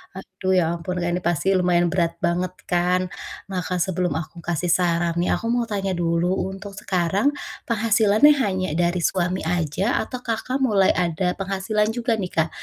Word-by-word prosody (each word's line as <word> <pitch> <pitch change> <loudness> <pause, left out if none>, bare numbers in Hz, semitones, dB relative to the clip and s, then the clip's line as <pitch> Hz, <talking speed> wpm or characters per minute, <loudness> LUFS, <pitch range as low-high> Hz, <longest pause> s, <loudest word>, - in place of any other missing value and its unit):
Aduh 190 0 -2
ya 180 - +4
ampun 170 +2 -4
Kak, 175 - 0
ini 180 - 0
pasti 175 +2 0
lumayan 175 -2 +2
berat 170 -2 0
banget 180 +1 0
kan, 180 +1 +1 0.5
maka 180 -1 -2
sebelum 180 0 0
aku 160 +1 -5
kasih 170 +1 -1
saran 170 -1 +1
nih 175 - +2
aku 230 +1 -2
mau 240 -1 0
tanya 195 -3 -2
dulu, 170 0 0 0.2
untuk 195 +1 -7
sekarang 190 +4 0 0.4
penghasilannya 220 +3 +4
hanya 190 -5 0
dari 175 +2 0
suami 180 0 0
aja? 175 - 0
Atau 250 -1 -5
Kakak, 255 +4 -2
mulai 200 -6 +4
ada 180 +1 0
penghasilan 195 +3 -1
juga 235 0 0
nih 190 -4 -4
Kak, 160 - +2
185 Hz, 165 wpm, -23 LUFS, 175-200 Hz, 0.5 s, ya